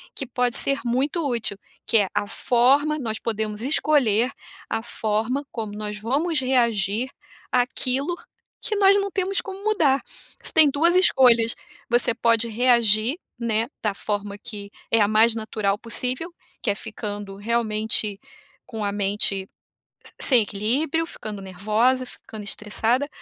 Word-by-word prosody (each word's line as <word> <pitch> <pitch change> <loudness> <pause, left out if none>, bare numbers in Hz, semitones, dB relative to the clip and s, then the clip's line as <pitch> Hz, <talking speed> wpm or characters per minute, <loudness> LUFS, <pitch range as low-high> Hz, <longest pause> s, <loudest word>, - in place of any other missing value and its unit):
que 275 - -2
pode 245 0 0
ser 275 0 0
muito 275 +7 0
útil, 230 -5 -1 0.3
que 230 - +4
é 205 -2 +3
a 205 - -1
forma 275 +7 +2
nós 220 -4 -3
podemos 215 -1 -3
escolher 255 -4 +2 0.4
a 225 - -2
forma 225 +5 -2
como 220 -3 -5
nós 210 0 -5
vamos 285 +8 0
reagir 235 -3 +1 0.4
àquilo 255 +5 0 0.5
que 435 - -1
nós 400 -1 +5
não 400 - -2
temos 390 +1 -1
como 390 0 -9
mudar. 315 -11 +2 0.4
Você - - +2
tem 315 -2 +6
2 325 +5 +2
escolhas, 245 -10 +4 0.3
você 240 0 +3
pode 230 -1 +2
reagir, 235 +2 +3 0.2
né, 230 -1 0
da 210 -2 0
forma 205 0 -4
que 205 -1 -7 0.2
é 225 - +4
a 205 - +4
mais 220 +2 +4
natural 215 -2 -1
possível, 255 +8 -1 0.3
que - - -1
é - - -3
ficando 205 -2 -7
realmente 215 -2 0 0.5
com 220 -2 -6
a 200 - 0
mente 200 -1 0 0.7
sem 250 -5 +6
equilíbrio, 265 +11 -1
ficando 210 -10 -7
nervosa, 215 +7 +1
ficando 220 -3 -10
estressada, 225 +6 +1
230 Hz, 140 wpm, -23 LUFS, 210-265 Hz, 0.7 s, tem